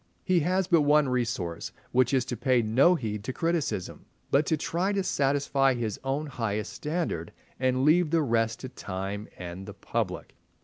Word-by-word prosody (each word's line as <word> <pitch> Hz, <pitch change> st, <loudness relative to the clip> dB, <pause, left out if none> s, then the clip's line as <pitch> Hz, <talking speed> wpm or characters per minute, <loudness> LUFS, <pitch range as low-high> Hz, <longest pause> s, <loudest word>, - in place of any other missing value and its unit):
He 185 Hz, -2 st, +3 dB
has 185 Hz, +4 st, +1 dB
but 170 Hz, -3 st, +4 dB
one 150 Hz, -1 st, +4 dB
resource, 115 Hz, -9 st, -2 dB, 0.2 s
which 130 Hz, 0 st, +3 dB
is 130 Hz, -3 st, +2 dB
to 125 Hz, -, -3 dB
pay 125 Hz, +1 st, +2 dB
no 130 Hz, +11 st, +4 dB
heed 105 Hz, -, -4 dB
to 120 Hz, -, -3 dB
criticism, 160 Hz, -, -2 dB, 0.2 s
but 140 Hz, +2 st, +3 dB
to 160 Hz, -, +2 dB
try 175 Hz, +6 st, -1 dB
to 195 Hz, -1 st, 0 dB
satisfy 140 Hz, -3 st, +2 dB
his 110 Hz, -4 st, -3 dB
own 135 Hz, +3 st, -1 dB
highest 115 Hz, -7 st, -3 dB
standard 150 Hz, -, -3 dB, 0.3 s
and 130 Hz, +1 st, +1 dB
leave 165 Hz, +2 st, +4 dB
the 165 Hz, 0 st, +2 dB
rest 115 Hz, -3 st, 0 dB
to 130 Hz, -, -6 dB
time 100 Hz, -3 st, -5 dB
and 90 Hz, +2 st, -7 dB
the 100 Hz, -, -8 dB
public. 100 Hz, -2 st, -3 dB
130 Hz, 175 wpm, -28 LUFS, 110-150 Hz, 0.3 s, but